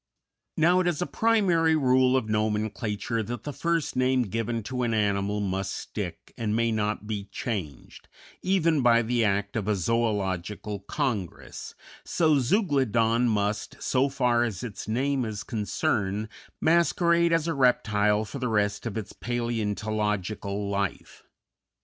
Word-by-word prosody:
Now 175 +3 +4
it 185 - +1
is 175 -4 0
a - - -2
primary 180 -9 +3
rule 130 -2 +4
of 125 -4 -1
nomenclature 110 +1 -1
that 120 +3 -5
the 145 - -5
first 165 +1 -1
name 130 0 +2
given 115 +1 -2
to 125 +3 -3
an 115 -2 +1
animal 100 -1 0
must 95 -1 -2
stick - - -6
and 110 -1 0
may 115 0 +2
not 105 -1 -1
be 105 -2 -4
changed, 100 - -6 0.3
even 165 -5 +2
by 120 -1 +5
the 120 +1 +1
act 100 -1 0
of 105 -3 -2
a 105 - +3
zoölogical 100 -1 -1
congress, 120 - -3 0.3
so 155 -4 +2
Zeuglodon 125 - +2
must, 105 -1 -1
so 135 +2 +1
far 125 -3 +2
as 110 -6 -3
its 110 -5 -6
name 130 +4 0
is 110 -3 -4
concerned, 105 -1 -1 0.3
masquerade 170 +1 +3
as 165 -1 +2
a 165 - 0
reptile 110 -6 +2
for 135 - -7
the 125 -1 -1
rest 105 0 0
of 115 - -4
its 110 -2 -5
paleontological 105 -3 -2
life. 100 -1 -3
115 Hz, 145 wpm, -27 LUFS, 105-130 Hz, 0.3 s, by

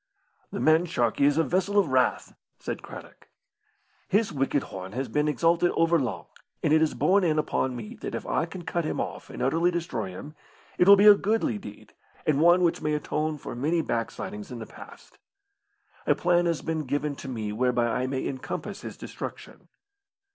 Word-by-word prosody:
"The - - -4
man 160 +2 +4
Sharkey 130 -1 +1
is 145 +1 +3
a 165 - +4
vessel 190 +4 0
of 195 -7 +4
wrath," 130 -1 +1 0.2
said - - -5
Craddock. - - -12 0.8
"His 205 -2 +1
wicked 135 0 0
horn 95 +1 -8
has 130 +2 -2
been 150 +6 0
exalted 165 +4 +2
over 165 0 +3
long, 130 -4 -3 0.4
and 150 - +3
it 155 - +5
is 160 - +1
borne 195 +1 +3
in 155 -3 +2
upon 130 -4 0
me 115 -3 -8
that - - -4
if - - -5
I 165 - 0
can 175 +1 -8
cut 170 0 -2
him 155 - -3
off - - -5
and - - -5
utterly 165 +7 +2
destroy 165 - -3
him, 95 +12 -9 0.5
it 180 - +5
will 200 - +11
be 200 +1 +4
a 210 - +11
goodly 200 - 0
deed, 105 0 -12 0.3
and 150 -1 +2
one 175 +2 +5
which 170 - +1
may 150 -1 0
atone 150 +1 -2
for - - -7
many 160 +6 0
backslidings 110 -4 -4
in 125 - -7
the 110 - -7
past. - - -14 0.9
A - - +4
plan 175 0 +2
has 170 -2 -1
been 160 -2 -2
given 145 +2 -2
to - - -8
me 110 -4 -4
whereby 125 +1 +1
I 125 +2 -1
may 130 0 -2
encompass 130 -2 -5
his - - -8
destruction." - - -8
150 Hz, 195 wpm, -26 LUFS, 125-170 Hz, 0.9 s, will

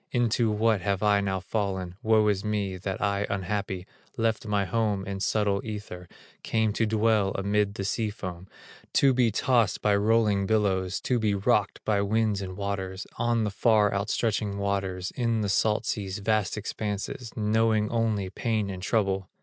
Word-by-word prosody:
Into 120 -2 +2
what 110 -1 +2
have 100 +1 -1
I 105 -1 +4
now 95 -1 -1
fallen? 95 -2 -3
Woe 110 -2 +3
is 100 -2 +1
me, 105 -3 -1
that 95 +1 -4
I 100 0 0
unhappy, 95 -1 -3 0.3
Left 115 -1 0
my 100 -1 +1
home 105 -2 0
in 100 0 -4
subtle 100 -1 +1
ether, 105 -5 -7 0.3
Came 110 -2 0
to 110 +1 +1
dwell 110 -2 +2
amid 100 +1 0
the 100 - -3
sea 110 +2 -1
foam, 95 -3 -7 0.5
To 135 -1 +5
be 125 -2 +3
tossed 115 +1 +1
by 105 -1 +4
rolling 105 -1 +2
billows, 95 -4 +1
To 125 -2 0
be 105 -2 +1
rocked 100 - +1
by 105 -2 +2
winds 105 0 +1
and 95 -1 -6
waters, 100 -1 -3
On 120 -1 +1
the 105 - -1
far 105 -1 +3
outstretching 105 0 -1
waters, 95 -2 -2
In 115 -3 0
the 100 - -1
salt 105 +2 +1
sea's 95 -2 -3
vast 110 0 0
expanses, 105 +3 -4
Knowing 110 0 +2
only 110 -5 0
pain 110 -1 -1
and 95 -1 -7
trouble! 95 -2 0
105 Hz, 165 wpm, -27 LUFS, 100-110 Hz, 0.5 s, To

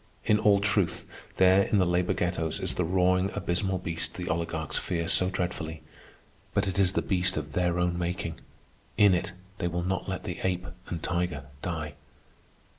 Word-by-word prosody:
In 105 -1 +4
all 100 -2 +5
truth, 100 -3 +1 0.3
there 95 +1 +6
in 105 - +1
the 95 - +4
labor 90 0 +1
ghettos 85 -3 -1
is - - -1
the 90 - 0
roaring 90 +2 +2
abysmal 95 +2 0
beast 85 -2 -1
the 90 -1 -4
oligarchs 80 -1 -2
fear 85 -1 -2
so 90 +1 +5
dreadfully—but 90 +2 -5
it 95 0 -1
is 95 -1 +3
the - - 0
beast 90 -1 +2
of - - -4
their 90 -1 +1
own 90 0 0
making. 85 -2 -3 0.6
In 100 -2 +6
it 90 - 0 0.3
they 85 - 0
will 85 0 -2
not 95 +1 -2
let 95 - -3
the 90 - -5
ape 90 -1 -1 0.2
and 85 -2 -5
tiger 85 -5 -1 0.2
die. 80 -4 -3
90 Hz, 175 wpm, -28 LUFS, 85-95 Hz, 0.6 s, there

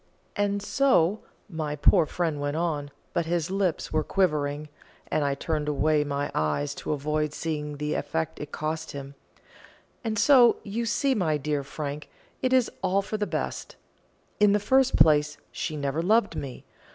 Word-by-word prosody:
And 205 0 0
so," 215 -7 +3 0.3
my 155 -6 -3
poor 160 +2 +4
friend 160 -4 -2
went 145 +1 -1
on, 155 -4 -1 0.2
but 170 -2 0
his 170 0 -1
lips 190 -6 -1
were 155 0 +2
quivering, 150 -6 0 0.4
and 155 - +1
I 140 -1 0
turned 150 +1 -2
away 150 +1 +2
my 145 0 -2
eyes 110 - 0
to - - -3
avoid 150 +1 -1
seeing 150 -2 -3
the 150 +1 -2
effort 160 +2 -1
it 145 0 -7
cost 160 +1 -3
him 140 0 -7 0.9
"and 220 -2 -2
so, 250 -1 +6
you 225 +3 -3
see, 275 +3 +2
my 165 -9 +1
dear 145 0 -2
Frank, 145 +1 -6 0.3
it 255 - +1
is 255 -2 +3
all 195 +1 +1
for 215 - -3
the 210 -1 -1
best. - - -4 0.6
In 210 -1 +5
the 210 - +3
first 260 +5 +3
place, 150 -1 +4
she 155 -2 -4
never 140 +2 -1
loved 210 +4 +2
me. 135 -3 -6
155 Hz, 165 wpm, -26 LUFS, 145-200 Hz, 0.9 s, so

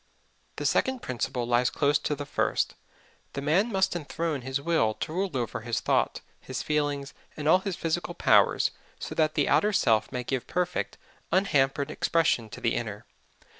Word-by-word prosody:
The - - -4
second 260 -2 +1
principle 125 0 -2
lies 120 +1 +3
close 145 0 +2
to 150 - -1
the 145 0 -6
first: - - 0 0.6
The 140 - -3
man 185 +11 +2
must 190 -2 +1
enthrone 160 -2 -2
his 130 +2 -2
will 140 -8 +1
to 155 - -5
rule 190 +3 0
over 120 -2 -3
his 120 0 -1
thought, - - +1 0.2
his - - -5
feelings, 145 -2 -1 0.2
and 150 -1 -3
all 170 +4 +6
his 190 -1 -3
physical 170 0 -2
powers, - - +4 0.3
so - - -6
that 155 -1 +1
the 145 - +2
outer 210 - +3
self 110 - +2
may 125 - -3
give 130 0 -3
perfect, 180 0 -2 0.3
unhampered 140 -6 +2
expression 155 -9 +1
to - - -9
the - - +1
inner. - - -4
145 Hz, 170 wpm, -27 LUFS, 130-170 Hz, 0.6 s, all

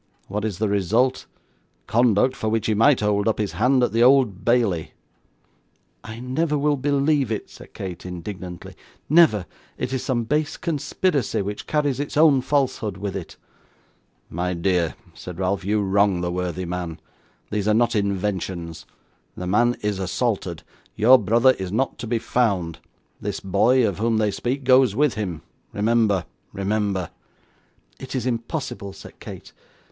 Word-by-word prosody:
What 105 +2 -3
is 105 -5 -2
the 110 +2 0
result? 110 +6 +1 0.6
Conduct 120 +2 +3
for 110 - -2
which 110 -1 0
he 110 - +2
might 115 +5 +4
hold 105 0 +1
up 110 - +1
his 105 -2 -1
hand 125 +3 +2
at - - +1
the 115 - +1
Old 125 -6 +4
Bailey.' 115 -9 +1 1.1
'I 110 +1 -8
never 150 +5 0
will 145 +1 +2
believe 140 -1 +1
it,' 110 - -4
said - - -14
Kate, 90 -3 -6
indignantly; 90 0 -7 0.3
'never. 150 - +5 0.3
It 125 - -3
is 130 - -1
some 125 -3 0
base 150 +5 -1
conspiracy, 150 - -1
which 105 +1 -6
carries 145 -4 0
its 145 0 -3
own 150 -4 +6
falsehood 130 -7 -1
with 100 0 -4
it.' 95 -4 -7 0.9
'My 90 +2 -2
dear,' 85 -1 0 0.2
said 90 -2 -9
Ralph, 95 +1 -1
'you 105 +2 +1
wrong 100 -1 +2
the 90 0 -2
worthy 90 0 -3
man. 85 -2 -4 0.5
These 105 -1 -1
are 105 - +4
not 120 +1 +2
inventions. 95 -5 -2 0.5
The 90 - -4
man 120 +6 +2
is 105 -2 -1
assaulted, 95 -3 -2 0.3
your 125 +4 +6
brother 115 +5 +4
is 95 -1 -4
not 130 +6 -1
to 120 - -5
be 115 +1 0
found; 100 -9 0 0.4
this - - -3
boy, 110 +6 +3
of 100 -2 -3
whom 115 0 +1
they 105 -1 +1
speak, 130 +6 -3
goes 130 -4 +5
with 145 0 +2
him 95 -7 -4 0.3
remember, 105 -3 +2 0.3
remember.' 100 -2 -1 0.9
'It 130 0 -7
is 125 -2 -2
impossible,' 120 - -3
said - - -13
Kate. - - -10
110 Hz, 155 wpm, -23 LUFS, 95-130 Hz, 1.1 s, own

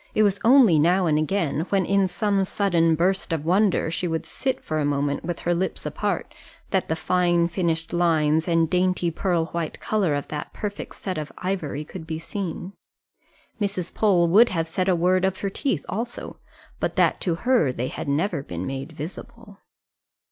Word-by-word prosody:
it 215 - +4
was 200 -1 +2
only 235 - +6
now 180 +4 +3
and 155 -2 +2
again, 155 -1 0
when 195 -2 +2
in 195 0 +2
some 200 +1 0
sudden 170 -4 +2
burst 185 +3 0
of 160 -2 -2
wonder 185 -1 +2
she 175 +1 -2
would 160 -1 -2
sit 265 -1 -2
for 155 -1 -2
a - - +1
moment 145 0 0
with 175 0 -4
her 175 - +1
lips 180 +2 -2
apart, - - -2 0.4
that 190 -2 +1
the 160 - +1
fine 175 0 +2
finished 170 -2 -2
lines 160 -2 +2
and 165 -1 +3
dainty 180 0 +1
pearl 170 -1 0
white 170 -2 -3
colour 195 -9 0
of 145 - -3
that 150 -1 -5
perfect 205 -1 -5
set 185 -5 -4
of 150 - -6
ivory 165 -6 -3
could 160 0 -9
be 160 -1 -3
seen. 180 +1 -5 0.9
Mrs. 195 -4 -2
Pole 185 -5 +3
would 215 +8 +6
have 165 -3 -1
said 185 +3 -1
a 185 - +4
word 180 +2 +2
of 190 0 +1
her 200 - -2
teeth 195 - -2
also, 235 +4 -5 0.4
but - - -2
that - - +2
to 175 -3 0
her 235 - +2
they 125 0 -3
had - - -6
never 160 +2 0
been 90 -8 -6
made 135 +4 -5
visible. 200 +7 -9
175 Hz, 185 wpm, -24 LUFS, 160-195 Hz, 0.9 s, only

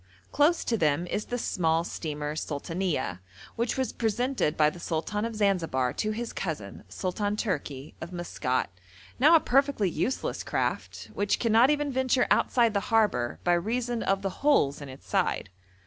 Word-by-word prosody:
Close 305 +4 +3
to 230 - +1
them 155 +2 +2
is 210 +4 -3
the 245 - -3
small 165 -7 +1
steamer 150 -3 -4
Sultanieh, 155 - -2 0.4
which 235 +2 -1
was 260 -4 -1
presented 235 - 0
by 150 - +5
the 175 - -11
Sultan 175 +6 -2
of 230 -1 -4
Zanzibar 165 - +1
to 215 - -1
his 230 +2 -4
cousin 145 - -5
Sultan 185 - -2
Tourki 145 - -3
of 165 +2 -6
Maskat, 160 - -2 0.5
now 305 +6 +7
a - - +8
perfectly 270 - +2
useless 260 - -2
craft, - - -3
which 205 0 +1
cannot 230 +2 +4
even 295 -1 +1
venture 260 -1 +2
outside 235 -3 +3
the 200 - +2
harbour 210 - +2
by 175 - +3
reason 235 +6 -1
of 195 0 0
the 195 -1 -4
holes 215 - +3
in 140 - -7
its 130 +1 -12
side. 95 - 0
200 Hz, 165 wpm, -28 LUFS, 155-240 Hz, 0.5 s, a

